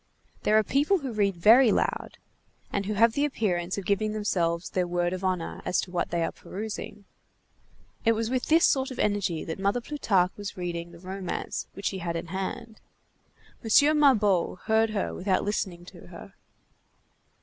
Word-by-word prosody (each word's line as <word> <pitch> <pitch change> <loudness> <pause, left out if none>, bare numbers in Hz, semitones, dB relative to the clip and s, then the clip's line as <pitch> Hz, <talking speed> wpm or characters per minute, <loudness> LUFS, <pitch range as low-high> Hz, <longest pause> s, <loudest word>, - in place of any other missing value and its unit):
There 215 - +3
are 215 - +4
people 290 - +2
who 270 -7 -5
read 200 -3 +1
very 225 +7 +6
loud, - - -1 0.6
and 200 -1 -1
who 215 - -1
have 225 +2 +4
the 285 - 0
appearance 185 -10 -1
of 200 - -5
giving 210 +1 0
themselves 175 -5 -1
their 180 -1 0
word 175 0 0
of 185 +1 -5
honor 185 -3 -2
as - - 0
to 180 - -8
what 180 - -1
they 170 -1 0
are - - -1
perusing. 210 0 -7 1.0
It 230 - +4
was 225 +1 -2
with 255 -1 -1
this 325 +2 +5
sort 265 -1 +2
of 260 - -8
energy 200 -6 0
that 160 - -5
Mother 200 +5 +1
Plutarque 210 -9 0
was 205 -1 -6
reading 170 -1 -4
the 170 - -13
romance 185 +1 -5
which 195 - -9
she 190 - -1
had 170 -1 -3
in 165 0 -5
hand. 195 +3 -5 0.8
M. 290 +7 +5
Mabeuf 210 - +3
heard 220 0 +2
her 210 -3 -2
without 185 0 0
listening 185 -4 -3
to - - -13
her. - - -12
200 Hz, 180 wpm, -27 LUFS, 180-225 Hz, 1.0 s, very